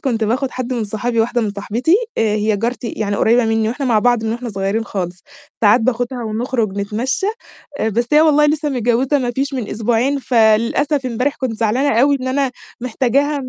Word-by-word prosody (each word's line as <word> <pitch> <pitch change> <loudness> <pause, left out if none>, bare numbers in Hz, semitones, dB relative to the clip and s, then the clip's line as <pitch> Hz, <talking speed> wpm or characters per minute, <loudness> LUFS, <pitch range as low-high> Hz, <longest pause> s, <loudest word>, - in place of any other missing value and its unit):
كنت 230 -5 -1
باخد 255 +4 -1
حد 255 0 -4
من 235 -3 -1
صحابي، 225 +3 -1
واحدة 240 +2 0
من 210 - -1
صاحبتي، 225 - 0 0.2
هي 215 -1 +1
جارتي 235 +2 -3
يعني 205 -2 -2
قريبة 235 +1 +3
مني 225 0 +1
وإحنا 265 +3 -3
مع 225 -3 +3
بعض 240 0 +2
من 220 - -1
وإحنا 240 0 -5
صغيّرين 200 +2 -2
خالص، 185 -3 -5 0.4
ساعات 220 +2 +5
باخدها 245 +1 -1
ونخرج 220 -2 -2
نتمشّى، 230 - -2 0.7
بس 235 +2 0
هي 300 - +7
والله 300 -1 +4
لسّه 300 0 0
متجوّزة 255 +2 +1
مافيش 265 +2 -2
من 240 -5 -3
أسبوعين 235 +5 0
فللأسف 245 +4 +2
امبارح 250 +4 -1
كنت 255 -3 -2
زعلانة 230 +3 +1
أوي 280 +2 +4
إن 260 - -3
أنا 270 0 0 0.3
محتاجاها. 270 +4 0
240 Hz, 180 wpm, -18 LUFS, 220-265 Hz, 0.7 s, هي